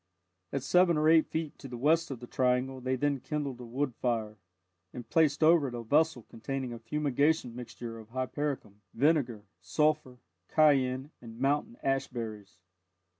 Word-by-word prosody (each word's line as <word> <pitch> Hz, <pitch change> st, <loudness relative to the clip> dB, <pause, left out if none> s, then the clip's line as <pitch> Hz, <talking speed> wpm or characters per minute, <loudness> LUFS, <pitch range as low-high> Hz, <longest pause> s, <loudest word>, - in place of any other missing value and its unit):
At 135 Hz, -2 st, -2 dB
seven 175 Hz, +3 st, +4 dB
or 155 Hz, +1 st, +2 dB
eight 160 Hz, 0 st, +5 dB
feet 160 Hz, -2 st, -4 dB
to 135 Hz, -, -8 dB
the 125 Hz, -2 st, -7 dB
west 160 Hz, +6 st, +2 dB
of 135 Hz, -4 st, -5 dB
the 120 Hz, -, -8 dB
triangle 130 Hz, +1 st, 0 dB
they 130 Hz, +1 st, 0 dB
then 140 Hz, +1 st, 0 dB
kindled 140 Hz, -2 st, -4 dB
a -, -, -7 dB
wood 130 Hz, +3 st, -2 dB
fire, 110 Hz, -3 st, -2 dB, 0.5 s
and 120 Hz, -2 st, -8 dB
placed 155 Hz, 0 st, +2 dB
over 160 Hz, -2 st, +5 dB
it 120 Hz, -, -5 dB
a 120 Hz, -, -5 dB
vessel 150 Hz, +1 st, +2 dB
containing 130 Hz, +3 st, -5 dB
a 115 Hz, -, -7 dB
fumigation 145 Hz, +1 st, 0 dB
mixture 120 Hz, -1 st, -7 dB
of 110 Hz, -1 st, -13 dB
hypericum, 130 Hz, -4 st, -3 dB
vinegar, 130 Hz, -6 st, +2 dB, 0.2 s
sulphur, 150 Hz, -, 0 dB, 0.3 s
cayenne, 135 Hz, -2 st, +3 dB
and 115 Hz, -1 st, -11 dB
mountain 145 Hz, -, 0 dB
ash 135 Hz, 0 st, +1 dB
berries. 110 Hz, -6 st, -7 dB
130 Hz, 165 wpm, -30 LUFS, 120-150 Hz, 0.5 s, eight